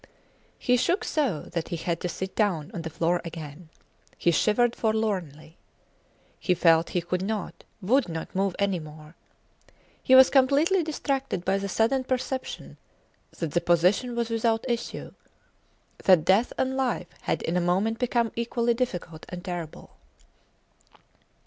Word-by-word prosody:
He 250 0 +2
shook 350 - +1
so 260 - -1
that 170 -2 -2
he - - -3
had 170 0 -3
to 180 - -2
sit 190 +3 -5
down 190 -6 0
on 175 - -4
the 165 - -5
floor 170 +3 0
again. 160 -1 -9 0.5
He 170 - +2
shivered 230 +7 +2
forlornly. 190 -9 -2 0.8
He 180 - +1
felt 165 -1 +4
he - - +2
could 180 +2 -2
not, 205 -1 -4 0.2
would 250 +2 +2
not 160 -1 -6
move 195 -1 0
any 200 -3 0
more. 155 0 -12 0.9
He 260 - +5
was 260 0 +8
completely 285 +8 +4
distracted 275 - -2
by 195 +1 +1
the 200 0 -4
sudden 230 +6 +1
perception 260 +1 -4 0.6
that 165 -4 -3
the 175 - +1
position 180 +8 +2
was 235 -1 -2
without 225 +1 0
issue 235 -1 -3 0.9
that 180 -5 +6
death 200 +6 +3
and 265 0 0
life 255 -9 -1
had - - -2
in 165 - -1
a 180 - +2
moment 195 +6 +1
become 235 -2 +1
equally 235 0 0
difficult 180 -10 -4
and 175 0 -7
terrible. 175 -4 -7
195 Hz, 150 wpm, -26 LUFS, 170-240 Hz, 0.9 s, was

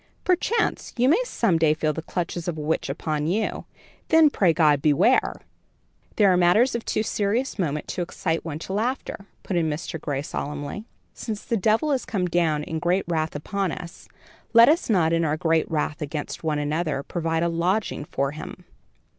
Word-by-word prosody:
Perchance 410 +5 0
you 245 +1 +3
may 340 - +4
some 175 - +1
day 155 -1 +3
feel 155 -1 0
the 160 - -4
clutches 175 0 -4
of 170 -2 -2
a - - -4
witch 150 -1 -1
upon 150 +1 -2
you, 205 +6 -1 0.4
then, 320 -2 +5
pray 185 -10 +3
God, 150 -3 +3
beware." 160 - +3 0.8
"These 210 - +4
are 185 -2 +5
matters 180 +9 +4
of 235 -1 -3
too 215 - -1
serious 220 +4 -1
moment 150 -4 -2
to - - -3
excite 165 -1 -2
one 155 -3 -5
to 180 +4 -6
laughter," 220 -2 -3 0.2
put 185 - -2
in 165 -2 +1
Mr. 155 +1 -5
Gray, 140 -1 -2
solemnly. 145 +8 -5 0.3
"Since 215 -3 -6
the 230 - 0
devil 225 +8 +2
is 265 -3 0
come 190 -5 -1
down 165 -4 +1
in 160 +1 -4
great 180 +4 +1
wrath 160 -2 -1
upon 190 +5 -2
us, 175 +1 -9 0.5
let 230 +1 +8
us 315 -3 +2
not 170 -6 +3
in 165 0 +2
our 155 -1 0
great 160 0 +1
wrath 150 -1 -2
against 150 +2 -5
one 155 -2 0
another 150 -1 -1
provide 165 0 -1
a - - +2
lodging 170 +1 -1
for 140 -2 -2
him." 150 - -9
170 Hz, 190 wpm, -24 LUFS, 155-205 Hz, 0.8 s, let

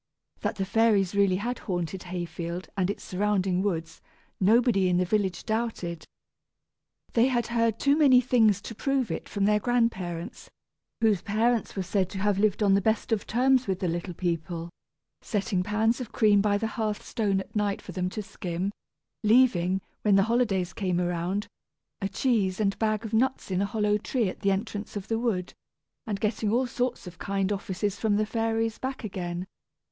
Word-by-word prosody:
That - - -2
the 195 -2 -2
fairies 205 -2 +3
really 200 -2 +3
had 235 +6 -3
haunted 175 -1 -3
Hayfield 175 0 -5
and 190 -2 0
its 200 - -4
surrounding 190 -1 0
woods, 165 -5 -3 0.4
nobody 205 -1 +4
in 175 - +2
the 180 - +2
village 190 -2 0
doubted. 220 -7 -2 1.1
They 235 +2 +4
had 240 -3 +1
heard 230 -2 +2
too 280 0 +4
many 280 -5 +6
things 225 -5 +3
to - - -6
prove 270 +1 0
it - - -5
from 200 -1 0
their 210 0 +3
grandparents, 195 -8 -1 0.5
whose 215 -5 +3
parents 225 +3 0
were 195 - -1
said 185 0 0
to 190 - -7
have 200 0 +1
lived 210 0 +2
on 200 -1 +4
the 200 - +4
best 220 +3 0
of 220 -2 0
terms 255 +1 +3
with 190 -2 0
the 185 - -2
little 175 +1 -3
people 170 -1 -3 0.5
setting 205 -3 -1
pans 220 +5 +1
of 245 - -6
cream 210 -2 +4
by 205 0 +2
the 220 - -2
hearth 215 -1 -3
stone 205 -4 0
at 190 - -9
night 205 -1 0
for - - -9
them 180 0 -2
to 210 +3 -5
skim 185 -1 -4 0.5
leaving, 200 -5 +4 0.2
when 205 -2 +4
the 195 - +5
holidays 205 -6 +1
came 185 -3 -1
around, 180 +3 -1 0.6
a 195 - -1
cheese 200 -3 +1
and 200 -2 0
bag 215 0 0
of 220 - -6
nuts 255 -2 +1
in 185 +1 +1
a 200 - +1
hollow 210 -1 +1
tree 230 0 0
at - - -8
the 200 - +1
entrance 205 +2 -3
of 200 -2 -5
the 225 0 +1
wood 200 -7 -1 0.5
and 205 -2 -2
getting 215 0 0
all 250 +3 +2
sorts 245 -1 -2
of 180 -2 -10
kind 195 0 -1
offices 200 0 -2
from 215 -2 +2
the 215 +1 +2
fairies 225 0 -1
back 260 0 -4
again. 180 -3 -4
205 Hz, 185 wpm, -27 LUFS, 185-225 Hz, 1.1 s, many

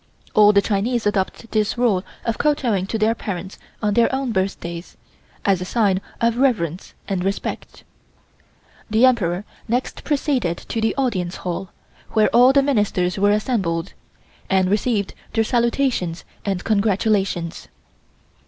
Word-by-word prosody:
All 210 -1 +7
the 200 -1 +3
Chinese 225 +3 0
adopt 205 +2 -1
this 215 +1 0
rule 220 -7 +2 0.2
of 230 - -1
kowtowing 240 -10 +1
to 225 - -2
their 220 +1 +2
parents 190 -4 -6 0.2
on 210 -1 +2
their 235 +2 +3
own 265 -2 -1
birthdays, 185 -3 -3 0.5
as 195 -3 +2
a - - -1
sign 195 -3 +1 0.2
of 235 0 +1
reverence 195 - 0
and 190 -3 -1
respect. 195 +1 -4 1.1
The 220 +4 +5
Emperor 200 -7 +1 0.2
next 245 +3 -2
proceeded 270 - 0
to 225 - -1
the 220 - +1
Audience 190 -10 -1
Hall, 180 +1 -3 0.4
where 215 -1 +4
all 245 +2 +6
the 275 0 +4
Ministers 205 -8 +1
were 205 +1 +4
assembled, 200 -5 0 0.6
and 190 -1 +2
received 210 -1 0 0.2
their 225 - +3
salutations 235 -7 0 0.2
and 195 -3 -1
congratulations. 200 -4 0
210 Hz, 135 wpm, -21 LUFS, 190-235 Hz, 1.1 s, All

